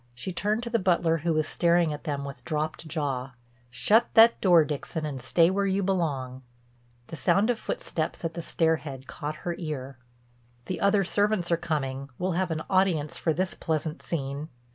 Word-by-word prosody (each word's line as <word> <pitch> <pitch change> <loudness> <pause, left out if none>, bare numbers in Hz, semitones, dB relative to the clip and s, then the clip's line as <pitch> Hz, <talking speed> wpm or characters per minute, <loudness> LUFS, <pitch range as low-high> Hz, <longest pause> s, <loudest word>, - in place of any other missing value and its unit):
She 125 +9 -4
turned 210 +6 -1
to 235 - -4
the 230 - +2
butler 170 -3 +2
who 165 +2 -1
was 155 -1 +1
staring 170 -2 +2
at 150 - -8
them 140 -3 -2
with 135 -3 -8
dropped 155 +1 -3
jaw: 140 -5 -3 0.4
"Shut 205 - +3
that 230 +1 +7
door, 175 -5 +6
Dixon, 155 +2 -4
and 140 -4 -5
stay 165 +7 +3
where 200 +1 +1
you 195 +1 +1
belong." 140 -9 -1 0.7
The - - -6
sound 205 +8 +2
of 230 - -3
footsteps 160 +1 -3
at 165 - -2
the 170 - -5
stair 160 0 +1
head 135 -3 -8
caught 150 +3 -5
her 175 - 0
ear. 140 -6 -5 0.7
"The 185 - -4
other 200 0 +4
servants 205 -1 +1
are - - +5
coming: 140 -5 -3
we'll 185 +1 -1
have 180 +2 0
an 160 -1 -2
audience 185 -6 +1
for 165 - +1
this 185 +3 -1
pleasant 160 -1 -3
scene. 140 -1 -4
160 Hz, 185 wpm, -27 LUFS, 145-185 Hz, 0.7 s, that